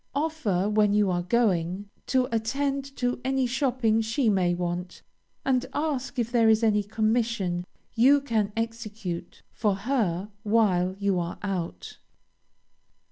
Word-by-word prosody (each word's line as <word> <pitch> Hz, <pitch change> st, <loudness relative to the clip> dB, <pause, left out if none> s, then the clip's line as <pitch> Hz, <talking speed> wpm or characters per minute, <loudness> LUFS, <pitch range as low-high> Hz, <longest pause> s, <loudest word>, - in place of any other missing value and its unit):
Offer, 280 Hz, -, 0 dB
when 210 Hz, -1 st, +3 dB
you 205 Hz, -3 st, +3 dB
are 175 Hz, -1 st, 0 dB
going, 185 Hz, -2 st, 0 dB, 0.2 s
to 255 Hz, -1 st, +2 dB
attend 275 Hz, +5 st, -1 dB
to 245 Hz, 0 st, -1 dB
any 265 Hz, 0 st, +1 dB
shopping 245 Hz, -3 st, +1 dB
she 225 Hz, +2 st, +1 dB
may 180 Hz, -3 st, +2 dB
want, 175 Hz, 0 st, -4 dB, 0.4 s
and 255 Hz, -2 st, +2 dB
ask 285 Hz, -3 st, -2 dB
if 235 Hz, -1 st, -1 dB
there 230 Hz, -2 st, +4 dB
is 220 Hz, +1 st, +4 dB
any 210 Hz, -2 st, +3 dB
commission 215 Hz, -4 st, 0 dB, 0.3 s
you 265 Hz, +5 st, +5 dB
can 225 Hz, -7 st, -1 dB
execute 220 Hz, -6 st, -5 dB
for 210 Hz, -3 st, 0 dB
her 205 Hz, -4 st, -1 dB
while 195 Hz, -5 st, +2 dB
you 200 Hz, -2 st, +1 dB
are 170 Hz, 0 st, -4 dB
out. 175 Hz, -, -4 dB
220 Hz, 135 wpm, -26 LUFS, 190-245 Hz, 0.4 s, you